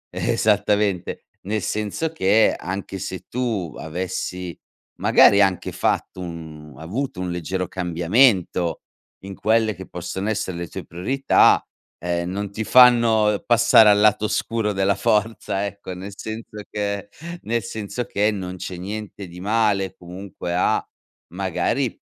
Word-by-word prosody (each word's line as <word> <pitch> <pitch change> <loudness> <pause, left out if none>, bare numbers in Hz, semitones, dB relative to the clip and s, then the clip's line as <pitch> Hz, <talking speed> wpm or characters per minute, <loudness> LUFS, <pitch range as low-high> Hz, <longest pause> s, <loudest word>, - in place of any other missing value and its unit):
Esattamente, 105 -3 +1 0.2
nel 105 +2 -2
senso 105 - -2
che 110 -5 +3
anche 95 +1 -5
se 95 -1 -6
tu 115 -10 -2
avessi 90 +1 -4 0.4
magari 100 - +6
anche 95 -2 +1
fatto, 90 - -1
mhmm, 80 -4 -8
un - - -15
avuto 100 - -4
un 90 - -3
leggero 90 +2 -3
cambiamento 90 - +2 0.5
in 95 0 -7
quelle 110 0 +2
che 95 +1 -10
possono 95 +3 -4
essere 100 -4 -2
le 85 0 -4
tue - - -7
priorità, 130 +11 +3 0.4
ehm, 85 0 -2
non 100 +1 -3
ti 110 +2 -3
fanno 115 -4 +5
passare 120 -2 +6
al 105 0 +5
lato 105 0 +4
oscuro 110 0 -1
della 95 +1 +1
Forza, 105 -3 0
ecco. 100 -1 -8
Nel 95 +2 -8
senso 110 0 -7
che 100 -1 -3 0.3
nel 115 +1 -1
senso 110 +1 -5
che 105 -2 +1
non 95 -3 -5
c'è 90 0 -6
niente 100 +1 -6
di 90 +1 -11
male 105 -2 +1
comunque 90 0 -6
a 90 - +2 0.5
magari, - - -1
100 Hz, 135 wpm, -22 LUFS, 90-110 Hz, 0.5 s, magari